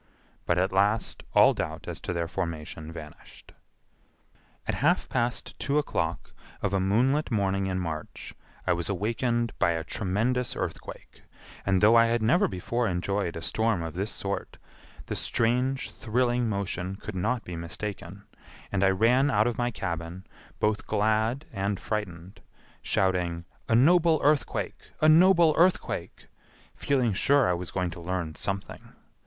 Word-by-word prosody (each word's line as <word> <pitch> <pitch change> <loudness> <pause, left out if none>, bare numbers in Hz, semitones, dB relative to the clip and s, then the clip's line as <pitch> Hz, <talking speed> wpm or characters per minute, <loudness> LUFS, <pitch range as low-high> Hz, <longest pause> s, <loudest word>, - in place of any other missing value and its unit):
But 85 - +2
at 95 +2 +1
last 100 +3 +1
all - - +7
doubt - - -5
as - - -4
to - - -4
their 85 -1 -2
formation 80 -3 -5
vanished. 75 -2 -12 1.2
At - - 0
half - - +2
past 120 +1 -2
two 140 +1 0
o'clock 150 - -2 0.3
of 100 - -2
a 100 - +2
moonlit 125 +10 +2
morning 100 -4 0
in 95 -1 -1
March, 80 -3 -6 0.3
I 90 - +3
was 85 +1 -2
awakened 115 +4 -1
by 85 - +3
a 80 -1 -3
tremendous 110 +8 -1
earthquake, - - -6 0.5
and 95 -1 +3
though 110 +2 +6
I 115 0 +6
had 115 -1 0
never 175 - +4
before 115 +6 -2
enjoyed 95 0 -1
a 80 - -6
storm 110 0 0
of 80 -1 -5
this 100 +4 -2
sort, 100 0 -4 0.5
the - - -4
strange 125 +4 0
thrilling 120 0 0
motion 95 -2 -3
could 105 +1 -8
not 110 +6 -1
be 90 - -7
mistaken, 90 +3 -6 0.5
and 100 -1 +1
I 95 - +5
ran 120 +8 +3
out 110 -5 +3
of 120 -1 -1
my 120 0 +1
cabin, 85 -3 -5 0.3
both 105 0 0
glad 110 +6 +1
and 100 -1 -1
frightened, 95 -5 -5 0.4
shouting, 90 -3 0 0.2
"A 115 - +4
noble 165 +5 +5
earthquake! 145 0 0
A 155 - +4
noble 170 0 +6
earthquake!" 180 +1 +1 0.5
feeling 130 -6 +1
sure 140 +7 +3
I 90 - +2
was 90 0 -4
going 90 -2 -2
to 85 - -9
learn 85 -2 -3
something. 95 +4 -5
100 Hz, 150 wpm, -27 LUFS, 90-120 Hz, 1.2 s, all